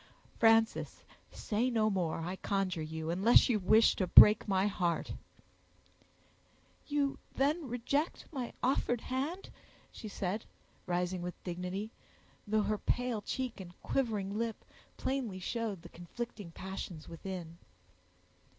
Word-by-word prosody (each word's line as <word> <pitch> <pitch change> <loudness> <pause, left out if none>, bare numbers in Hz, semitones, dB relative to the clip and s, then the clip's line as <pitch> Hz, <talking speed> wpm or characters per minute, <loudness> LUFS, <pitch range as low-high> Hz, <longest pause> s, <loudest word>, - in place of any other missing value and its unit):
"Frances, 225 0 +3 0.3
say 230 +4 -1
no 220 -3 +2
more, 175 -4 -1
I 175 +3 -3
conjure 190 -5 -1
you, 160 +1 -4
unless 195 +10 +5
you 225 -4 +2
wish 215 +4 +5
to 185 - 0
break 210 +5 +8
my 190 -1 +2
heart." 180 -5 -1 1.7
"You 285 -2 0 0.2
then 290 +3 +1
reject 255 +6 -1
my 260 -6 -4
offered 245 -2 +1
hand?" 285 +9 -3 0.4
she 220 - -8
said, 200 +1 -3 0.4
rising 180 0 -1
with 180 0 -4
dignity, 180 +4 -4 0.6
though 215 0 +2
her 210 +1 -1
pale 245 -3 -1
cheek 255 +1 -4
and 175 -2 -10
quivering 215 -6 -1
lip 230 -1 -3 0.3
plainly 260 -8 -2
showed 205 -1 -3
the 170 - -10
conflicting 200 +3 -7
passions 180 -2 -7
within. 170 -1 -7
210 Hz, 125 wpm, -33 LUFS, 180-240 Hz, 1.7 s, break